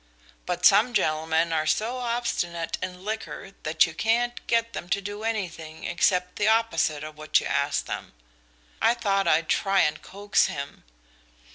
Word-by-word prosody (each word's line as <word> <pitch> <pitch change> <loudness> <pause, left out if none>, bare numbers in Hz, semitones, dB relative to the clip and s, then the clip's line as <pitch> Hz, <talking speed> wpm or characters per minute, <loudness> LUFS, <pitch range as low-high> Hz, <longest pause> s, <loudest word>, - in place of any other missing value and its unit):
But 180 0 -1
some 220 +4 +5
gentlemen 160 -1 +1
are 155 -1 0
so 225 +10 0
obstinate 230 -9 -2
in 185 0 -6
liquor 215 -2 -5
that 155 +1 +3
you 170 - -7
can't 235 +6 0
get 230 0 +1
them 175 - -6
to 195 - +1
do 205 +1 -6
anything 175 -8 -4
except 180 +1 +1
the 210 - +1
opposite 215 -10 +2
of 155 0 -9
what 155 - +2
you - - -6
ask 140 0 0
them. - - -6 0.7
I 235 - +4
thought 195 -5 0
I'd 165 -1 +3
try 195 -1 +2
and 150 - 0
coax 205 +1 +1
him. 140 - -7
185 Hz, 160 wpm, -26 LUFS, 160-220 Hz, 0.7 s, some